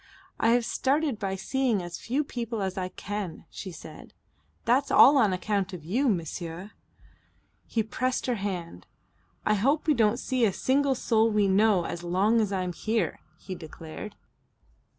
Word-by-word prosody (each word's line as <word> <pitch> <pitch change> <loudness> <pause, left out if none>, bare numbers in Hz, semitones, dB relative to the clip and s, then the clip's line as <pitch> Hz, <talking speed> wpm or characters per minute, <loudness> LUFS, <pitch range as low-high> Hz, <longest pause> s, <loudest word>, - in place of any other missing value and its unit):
"I - - +2
have 240 -1 +2
started 275 -2 0
by 195 -1 -2
seeing 230 0 0
as 175 0 -7
few 270 +6 -1
people 235 -5 -4
as 190 -1 -2
I 185 -1 -3
can," 200 -5 -6
she 190 - -7
said. 155 -1 -12 0.5
"That's 255 +4 +3
all 285 - +8
on 220 -7 +4
account 195 +1 -1
of 165 -4 -8
you, 245 - +1
monsieur." 175 +1 -4 1.0
He 225 - 0
pressed 255 +4 -2
her 250 - +1
hand. 175 - -5 0.6
"I 215 - +3
hope 270 +9 +1
we 310 - +4
don't 225 -3 +3
see 255 -1 -1
a 205 -4 +3
single 275 +4 +2
soul 225 -2 +2
we 210 -2 +2
know 195 -2 +3
as 170 - -4
long 195 +6 +2
as 205 -2 -1
I'm 185 -2 -2
here," 215 -2 -1 0.2
he 190 - -7
declared. 165 +4 -9
210 Hz, 165 wpm, -27 LUFS, 185-240 Hz, 1.0 s, all